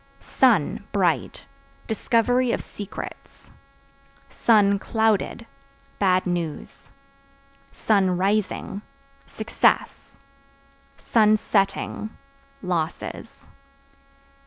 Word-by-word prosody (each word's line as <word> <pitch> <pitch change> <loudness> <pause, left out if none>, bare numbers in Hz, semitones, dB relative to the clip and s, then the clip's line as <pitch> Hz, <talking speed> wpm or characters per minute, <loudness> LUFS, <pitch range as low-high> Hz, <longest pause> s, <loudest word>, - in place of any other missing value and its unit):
Sun 220 - +2
(Bright) 175 - 0 0.4
discovery 240 +3 +1
of - - -1
secrets; 205 -1 -10 1.3
(clouded) 220 +1 0 0.5
bad 185 -2 +2
news; 175 -4 -4 1.0
(rising) 195 0 +1 0.5
success; 220 - 0 1.0
(setting) 215 -1 +1 0.5
losses. 170 -3 -4
200 Hz, 50 wpm, -24 LUFS, 180-220 Hz, 1.3 s, Sun